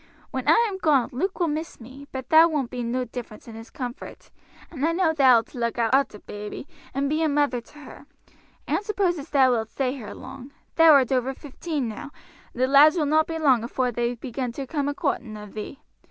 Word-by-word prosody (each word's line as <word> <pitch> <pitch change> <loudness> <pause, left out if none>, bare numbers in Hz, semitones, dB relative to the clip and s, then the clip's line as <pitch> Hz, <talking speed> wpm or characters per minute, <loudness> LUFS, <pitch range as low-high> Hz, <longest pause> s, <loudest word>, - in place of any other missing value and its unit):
When - - -4
I 470 - +5
am 385 -3 -5
gone 285 -8 +2
Luke 370 +11 -3
will 345 - +2
miss 315 +2 -4
me, 260 +4 -12
but 260 -1 -6
thar 320 +1 +7
won't 290 -7 -2
be 250 - -4
no 245 +2 -2
difference 235 -2 -9
in 230 - -9
his 225 +1 -10
comfort, 245 -2 -8 0.4
and 290 -4 -6
I 330 +2 +2
know 335 -2 +2
thou'lt 255 -6 +4
look 235 -2 -2
arter 240 0 +1
baby 210 +6 -8 0.2
and 275 +2 -1
be 310 +3 0
a 320 - +2
mother 285 -4 +1
to 265 +6 -20
her. 290 -1 -13 0.6
I - - -7
don't - - +1
suppose 385 -5 0
as 285 - -9
thou 265 -3 +4
wilt 225 -2 -1
stay 260 0 -1
here 235 -7 -8
long; 270 +2 -11 0.2
thou 325 -1 +7
art 270 -3 +4
over 260 +1 0
fifteen 290 -1 -4
now, 225 +6 -7 0.4
and 250 - -2
the - - +6
lads 290 +4 +6
will 310 - +1
not 310 +2 +2
be 325 - -4
long 265 -7 +3
afore 250 +1 -1
they 240 +1 -1
begin 250 +1 -4
to 275 +2 -5
come 285 +1 -2
a 290 - -4
coorting 235 -9 -3
of 210 -1 -11
thee. 215 +6 -8
270 Hz, 225 wpm, -24 LUFS, 240-305 Hz, 0.6 s, thar